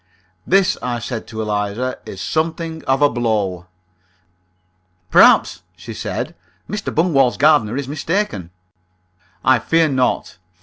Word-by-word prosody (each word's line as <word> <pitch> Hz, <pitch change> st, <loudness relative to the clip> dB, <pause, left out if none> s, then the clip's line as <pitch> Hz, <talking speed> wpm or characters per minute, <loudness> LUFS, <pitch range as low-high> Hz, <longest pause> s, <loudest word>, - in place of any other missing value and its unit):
"This," 195 Hz, 0 st, +3 dB
I 125 Hz, -1 st, -2 dB
said 115 Hz, 0 st, -5 dB
to 110 Hz, 0 st, -5 dB
Eliza, 105 Hz, +4 st, -2 dB
"is 95 Hz, -, -8 dB
something 160 Hz, 0 st, -2 dB
of 135 Hz, +2 st, +2 dB
a -, -, +7 dB
blow." 105 Hz, -8 st, -2 dB, 1.4 s
"Perhaps," -, -, +5 dB
she -, -, -9 dB
said, -, -, -4 dB, 0.3 s
"Mr. 210 Hz, 0 st, -4 dB
Bungwall's 140 Hz, -7 st, +2 dB
gardener 140 Hz, -6 st, +3 dB
is 140 Hz, -2 st, -3 dB
mistaken." 145 Hz, -, -2 dB, 1.0 s
"I 130 Hz, -2 st, +5 dB
fear 165 Hz, +5 st, +2 dB
not. 125 Hz, -8 st, -1 dB
130 Hz, 120 wpm, -19 LUFS, 110-160 Hz, 1.4 s, a